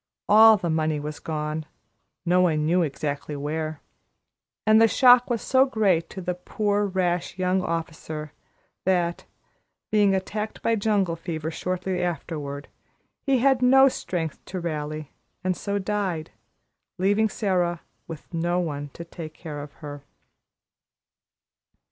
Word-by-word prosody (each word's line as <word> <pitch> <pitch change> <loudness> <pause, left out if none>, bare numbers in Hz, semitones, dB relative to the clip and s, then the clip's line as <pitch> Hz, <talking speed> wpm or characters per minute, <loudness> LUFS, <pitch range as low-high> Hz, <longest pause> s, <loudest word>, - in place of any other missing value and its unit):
All 220 +1 +8
the 175 -4 -2
money 155 -1 0
was 150 +1 -6
gone, 155 0 -3 0.6
no 180 +1 +4
one 155 -4 +2
knew 175 +3 +3
exactly 145 -1 -3
where, 155 +1 -3 0.8
and 215 +1 +6
the 225 - +7
shock 250 +1 +6
was 235 -2 -1
so 265 0 +4
great 195 -9 +1
to 190 - -7
the 180 0 -2
poor, 205 +3 -1
rash 180 -2 -1
young 185 0 +1
officer, 160 -3 -4 0.5
that, 175 -2 0 0.7
being 205 -2 +4
attacked 210 +3 -4
by 230 - +2
jungle 200 -5 +1
fever 160 -2 -4
shortly 180 +2 -2
afterward, 150 -5 -4 0.6
he 270 -1 +4
had 265 0 +3
no 265 +2 +7
strength 170 - -3
to 185 - -5
rally, 155 -3 -4 0.3
and 185 0 +1
so 200 +2 -2
died, 190 -5 -2 0.7
leaving 205 +4 +2
Sara, 180 -5 0 0.3
with 165 +1 -10
no 175 +2 0
one 145 -4 -3
to 170 - -8
take 160 -2 -9
care 150 -3 -7
of 145 0 -9
her. 145 -1 -7
175 Hz, 135 wpm, -25 LUFS, 155-205 Hz, 0.8 s, All